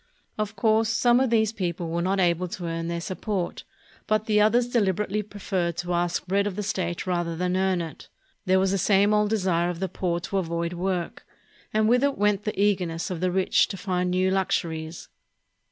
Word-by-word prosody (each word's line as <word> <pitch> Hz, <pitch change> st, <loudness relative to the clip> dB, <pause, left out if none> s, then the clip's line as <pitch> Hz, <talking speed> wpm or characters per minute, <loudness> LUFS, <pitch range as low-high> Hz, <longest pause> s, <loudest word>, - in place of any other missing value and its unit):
Of 215 Hz, 0 st, -3 dB
course 220 Hz, +2 st, +2 dB
some 240 Hz, +1 st, +3 dB
of 265 Hz, -1 st, +2 dB
these 220 Hz, -2 st, +2 dB
people 175 Hz, -4 st, -3 dB
were 170 Hz, +1 st, -1 dB
not 190 Hz, +2 st, 0 dB
able 175 Hz, 0 st, +2 dB
to 175 Hz, 0 st, -6 dB
earn 165 Hz, 0 st, -3 dB
their 170 Hz, 0 st, -2 dB
support, 185 Hz, +1 st, -3 dB, 0.4 s
but 215 Hz, 0 st, +1 dB
the 210 Hz, -1 st, +3 dB
others 235 Hz, +3 st, +3 dB
delib 210 Hz, -7 st, +1 dB
erately 210 Hz, +1 st, -2 dB
preferred 185 Hz, -5 st, -2 dB
to 175 Hz, +1 st, -2 dB
ask 175 Hz, 0 st, 0 dB
bread 200 Hz, +2 st, +1 dB
of 195 Hz, -, -4 dB
the 210 Hz, -, -3 dB
state 175 Hz, -3 st, -2 dB
rather 175 Hz, -2 st, -1 dB
than 180 Hz, +2 st, -1 dB
earn 190 Hz, -1 st, +1 dB
it. 165 Hz, -2 st, -8 dB, 0.4 s
There 185 Hz, 0 st, +4 dB
was 190 Hz, 0 st, +2 dB
the 195 Hz, -, 0 dB
same 200 Hz, +2 st, +3 dB
old 210 Hz, 0 st, +2 dB
desire 185 Hz, -5 st, +1 dB
of 175 Hz, -2 st, -4 dB
the 190 Hz, -, -1 dB
poor 175 Hz, -1 st, -2 dB
to 195 Hz, +3 st, -1 dB
avoid 170 Hz, -1 st, -2 dB
work; 180 Hz, -1 st, -3 dB, 0.5 s
and 215 Hz, 0 st, +2 dB
with 245 Hz, +3 st, +3 dB
it 280 Hz, -1 st, +1 dB
went 205 Hz, 0 st, +1 dB
the 215 Hz, -, -3 dB
eagerness 185 Hz, -5 st, 0 dB
of 175 Hz, -, -3 dB
the 185 Hz, +1 st, +1 dB
rich 190 Hz, +1 st, +3 dB
to 195 Hz, -, -6 dB
find 180 Hz, -2 st, -1 dB
new 185 Hz, +1 st, +1 dB
luxuries. 165 Hz, -4 st, -2 dB
190 Hz, 205 wpm, -25 LUFS, 175-210 Hz, 0.5 s, There